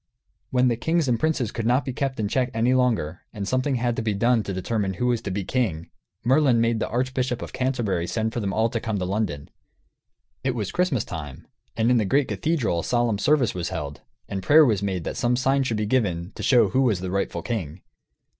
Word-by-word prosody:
When 125 0 +3
the 120 -2 +1
kings 160 +4 +1
and 120 -2 +1
princes 150 -8 0
could 115 -1 -3
not 125 +2 +2
be 130 - -3
kept 135 0 -2
in 105 - 0
check 125 +4 0
any 120 +3 +2
longer, 115 -11 +1
and 100 -3 -5
something 130 +4 0
had 120 -1 0
to - - 0
be 110 -2 -1
done 115 +3 +3
to 100 - -5
determine 95 +1 -2
who 125 - -2
was 120 -2 +1
to 100 - -5
be 100 +1 -2
king, 95 -8 -2 0.3
Merlin 130 -1 +4
made 115 -1 +2
the - - -2
Archbishop 125 0 -1
of - - -8
Canterbury 120 -10 -1
send 110 +2 -1
for - - -2
them 100 -3 -2
all 110 +3 +2
to 115 - -1
come 110 -2 -2
to 90 - -2
London. 95 -7 -3 0.9
It 130 -1 0
was 105 -5 -3
Christmas 175 - 0
time, 75 -5 -7 0.3
and 115 +2 +3
in 125 - +4
the 110 - +2
great 135 +7 +2
cathedral 145 - 0
a - - -3
solemn 120 -4 +1
service 140 0 +2
was 90 -2 -3
held, 75 -2 -5 0.3
and 95 - -4
prayer 150 +9 +6
was 105 -7 +1
made 95 -4 -2
that - - -4
some 120 +1 +2
sign 135 +2 +2
should 120 -5 -1
be 105 - -1
given, 100 -7 0
to - - -8
show 125 -3 +4
who 130 - +2
was 110 -9 +2
the 90 -1 -4
rightful 100 +1 -2
king. 90 -8 -4
115 Hz, 230 wpm, -24 LUFS, 100-130 Hz, 0.9 s, prayer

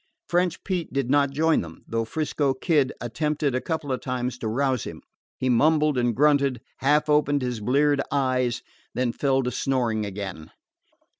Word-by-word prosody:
French 175 0 0
Pete 180 -4 -2
did 135 -2 -1
not 145 -1 +4
join 160 +3 +2
them, 80 -1 -10
though 115 0 -1
'Frisco 145 0 -1
Kid 145 -1 +2
attempted 145 +3 -1
a 130 - 0
couple 160 -4 -3
of 130 - -2
times 125 -1 -3
to 115 - -3
rouse 130 +2 0
him. - - -8 0.3
He 130 - -2
mumbled 150 +4 +3
and 120 -2 +1
grunted, 140 -3 +3 0.2
half 150 +3 +2
opened 145 -2 +2
his 125 -2 -2
bleared 140 +5 +2
eyes, 130 -3 0 0.3
then 125 -1 +1
fell 135 -1 +1
to 125 - -1
snoring 120 -6 0
again. 95 -5 -6
135 Hz, 165 wpm, -25 LUFS, 125-150 Hz, 0.3 s, not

